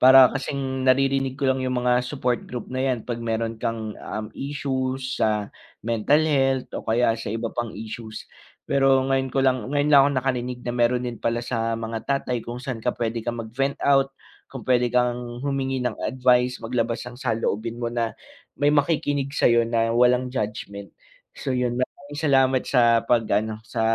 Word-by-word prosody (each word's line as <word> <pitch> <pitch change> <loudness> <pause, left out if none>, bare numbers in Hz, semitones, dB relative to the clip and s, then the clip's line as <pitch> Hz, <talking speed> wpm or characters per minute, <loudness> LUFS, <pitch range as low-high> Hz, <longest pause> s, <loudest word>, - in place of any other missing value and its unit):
Para 130 0 +8
kasing 135 -1 -2
naririnig 135 0 +2
ko 140 - -3
lang 130 0 +2
yung 130 -1 -1
mga 125 0 +4
support 125 -2 -1
group 125 0 -6
na 130 - -2
'yan 130 -4 0
'pag 120 -1 -4
meron 115 -1 -2
kang, 110 -2 -3
um, 110 0 -5
issues 135 -2 -3
sa 105 -2 0 0.3
mental 115 +7 +2
health 135 -4 +1
o - - -4
kaya 115 +1 +3
sa - - -5
iba 115 +2 -3
pang 120 -2 -3
issues. 110 +1 -7 0.4
Pero 135 -1 +3
ngayon 135 0 +1
ko 135 +1 0
lang 130 -3 +1
ngayon 145 +1 +1
lang 140 - +9
ako - - -2
nakarinig 125 -1 -1
na 120 - -2
meron 120 +1 +1
din 120 -1 -5
pala 115 0 -1
sa 115 -2 -1
mga 115 0 -4
tatay 130 -3 0
kung 120 +2 -7
saan 130 -4 -4
ka 125 +2 -1
pwede 115 -1 -2
kang 120 +1 -3
mag-vent 135 +5 -1
out, 135 -1 +4 0.4
kung 130 -5 -9
pwede 125 -1 +3
kang 120 0 -1
humingi 135 -2 -1
ng 120 -4 -2
advice, 125 -1 +2
maglabas 115 0 -1
ng 125 0 -10
saloobin 115 -2 -1
mo 120 0 -2
na 115 -1 -1 0.5
may 145 - +4
makikinig 145 -2 +1
sa'yo 120 -4 +4
na 115 0 +1
walang 125 +1 +4
judgment. 105 -4 -5 0.4
So, - - -7
yun 125 0 0
maraming 145 +3 -5
salamat 135 -4 +3
sa 120 -3 +4
pag-ano, 110 -2 +1
sa - - -4
125 Hz, 180 wpm, -24 LUFS, 115-135 Hz, 0.5 s, lang